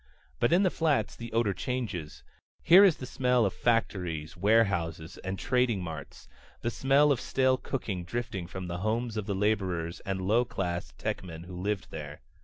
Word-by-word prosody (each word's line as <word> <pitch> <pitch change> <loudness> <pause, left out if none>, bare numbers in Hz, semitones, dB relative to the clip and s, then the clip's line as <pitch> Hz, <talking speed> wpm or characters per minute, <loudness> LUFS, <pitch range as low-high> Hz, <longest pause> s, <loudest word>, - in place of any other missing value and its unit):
But - - +2
in 180 +4 +5
the 185 - +3
Flats 145 -10 +1
the 115 0 -8
odor 115 -3 +2
changes. 100 -8 -4 0.4
Here 180 +5 +8
is 190 -6 +5
the 130 - -6
smell 125 -2 +2
of 95 - 0
factories, 90 -9 -1
warehouses, 95 -5 +1
and 95 +1 -4
trading 125 -6 +1
marts; 80 -5 -8 0.3
the 120 - -1
smell 140 +4 +4
of 130 -3 +1
stale 130 -1 +2
cooking 105 -10 -4
drifting 95 -3 -4
from 95 +1 -6
the 85 0 -4
homes 110 +3 -1
of 105 -2 -3
the 100 - -1
laborers 95 -5 0
and 95 -1 -3
lower 105 +6 +3
class 85 - -3
techmen 85 -3 -4
who 90 +1 -9
live 100 +1 -2
there. 75 -3 -7
100 Hz, 175 wpm, -29 LUFS, 90-120 Hz, 0.4 s, Here